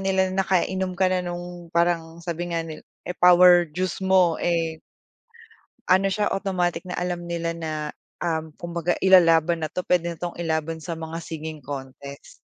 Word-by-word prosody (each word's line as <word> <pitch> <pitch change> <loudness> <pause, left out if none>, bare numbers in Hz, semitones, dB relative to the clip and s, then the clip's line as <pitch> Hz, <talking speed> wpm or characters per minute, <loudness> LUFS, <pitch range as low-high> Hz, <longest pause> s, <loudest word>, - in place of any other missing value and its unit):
nila 190 -1 +1
na 195 - +1
nakainom 190 0 0
ka 190 0 +3
na 185 - +1
'nong, 175 -1 -7
parang 170 -1 0
sabi 175 +1 -4
nga 165 -1 -1
ni 160 -1 -8 0.3
eh, 180 - -4
power 180 -1 +7
juice 185 +4 -2
mo, 185 -3 +3
eh 165 -2 -1 1.1
ano 190 +1 +5
siya, 210 +2 0
automatic 185 -2 -1
na 180 - -5
alam 175 -1 -3
nila 170 -1 -2
na, 160 -1 -4 0.5
um, 160 -2 -2
kumbaga 170 0 -2
ilalaban 170 -3 +5
na - - -8
'to, 180 - -3
puwede 170 -1 0
na 160 - -18
'tong 175 -1 -5
ilaban 160 -1 -2
sa 165 +2 -5
mga 160 0 -6
singing 160 -1 -6
contest. 140 +1 -9
175 Hz, 170 wpm, -24 LUFS, 165-180 Hz, 1.1 s, power